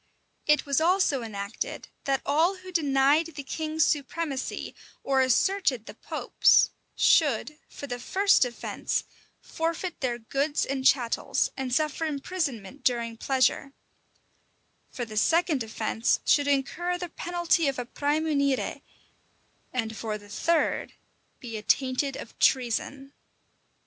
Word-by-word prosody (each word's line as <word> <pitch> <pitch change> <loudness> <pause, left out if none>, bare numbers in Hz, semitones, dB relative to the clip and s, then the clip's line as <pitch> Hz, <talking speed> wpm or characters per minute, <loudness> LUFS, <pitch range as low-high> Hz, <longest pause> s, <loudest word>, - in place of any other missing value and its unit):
It 300 0 +4
was 280 +1 +1
also 345 -6 +3
enacted, 205 -1 -5 0.2
that 270 -2 0
all 325 +7 +2
who 370 0 -11
denied 290 -1 +3
the 285 - -5
king's 315 +2 0
supremacy, 285 -1 -2 0.3
or 270 -1 +2
asserted 260 - +2
the - - -9
pope's, - - +3 0.2
should, 300 0 +3
for - - -8
the 245 -3 -5
first 390 +9 +3
offence, 245 -1 -2 0.4
forfeit 330 +2 -3
their 245 -3 -1
goods 275 +6 -1
and 270 -1 -3
chattels, 250 -3 +2
and 265 -1 -4
suffer 305 +3 0
imprisonment 285 - -4
during 235 -2 0
pleasure; 265 +2 +1 1.2
for 240 - -5
the 215 -1 -8
second 325 - +2
offence, 225 0 0
should 285 -1 +3
incur 310 +6 0
the 355 0 -5
penalty 345 -1 0
of 275 - -1
a 245 - -3
"præmunire;" 285 0 0 0.9
and 225 -3 -2
for 215 -1 -3
the 205 -1 -16
third, 330 +9 0 0.5
be 230 -3 -6
attainted 260 +5 0
of 225 - -10
treason. 270 +2 +1
275 Hz, 125 wpm, -27 LUFS, 245-315 Hz, 1.2 s, It